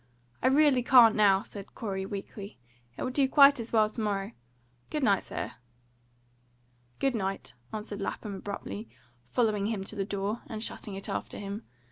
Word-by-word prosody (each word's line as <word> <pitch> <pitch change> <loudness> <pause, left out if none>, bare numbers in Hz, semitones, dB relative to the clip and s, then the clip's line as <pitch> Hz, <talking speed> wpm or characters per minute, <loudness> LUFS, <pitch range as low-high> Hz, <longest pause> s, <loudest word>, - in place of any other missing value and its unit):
"I - - +3
really 275 -1 +5
can't 240 -2 +7
now," 200 -2 +5
said 200 -2 -10
Corey 190 -3 -3
weakly. 200 +1 -7 0.4
"It - - -3
will 255 - -1
do 270 0 +2
quite 280 -1 +7
as 230 0 -5
well 220 -2 +4
to 220 +2 -6
morrow. 200 -1 -1 0.6
Good 300 -2 -2
night, 200 -5 +4
sir." - - -5 1.5
"Good 270 -1 +1
night," 195 -3 -3 0.2
answered 210 -1 -5
Lapham 205 +1 -4
abruptly, 115 - -6 0.4
following 210 - +1
him 215 -3 -2
to 205 - -5
the 200 - -1
door, 200 +3 -3
and 220 -3 -4
shutting 205 -3 -5
it 195 - -6
after - - -4
him. 200 +2 -6
210 Hz, 165 wpm, -29 LUFS, 195-235 Hz, 1.5 s, can't